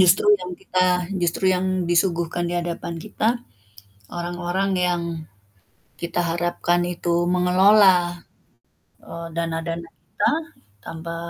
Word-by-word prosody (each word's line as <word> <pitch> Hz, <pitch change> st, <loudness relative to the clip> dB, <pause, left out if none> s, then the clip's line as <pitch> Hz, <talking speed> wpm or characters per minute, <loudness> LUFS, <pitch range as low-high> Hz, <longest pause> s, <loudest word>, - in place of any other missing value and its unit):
Justru 185 Hz, +3 st, +5 dB
yang 180 Hz, 0 st, -6 dB
kita 185 Hz, 0 st, +1 dB, 0.3 s
justru 175 Hz, +2 st, 0 dB
yang 180 Hz, +1 st, -1 dB, 0.3 s
disuguhkan 175 Hz, -1 st, +1 dB
di -, -, -2 dB
hadapan 170 Hz, 0 st, -4 dB
kita, 215 Hz, +3 st, -1 dB, 0.8 s
orang-orang 175 Hz, +2 st, -2 dB
yang 180 Hz, -1 st, +1 dB, 1.0 s
kita 170 Hz, +1 st, -1 dB
harapkan 175 Hz, +1 st, 0 dB
itu 170 Hz, 0 st, -1 dB, 0.2 s
mengelola, 180 Hz, -1 st, +4 dB, 0.8 s
eee, 170 Hz, 0 st, -8 dB
dana-dana 165 Hz, 0 st, -3 dB, 0.2 s
kita -, -, 0 dB, 0.5 s
tanpa 165 Hz, +1 st, -6 dB
175 Hz, 100 wpm, -23 LUFS, 170-180 Hz, 1.0 s, Justru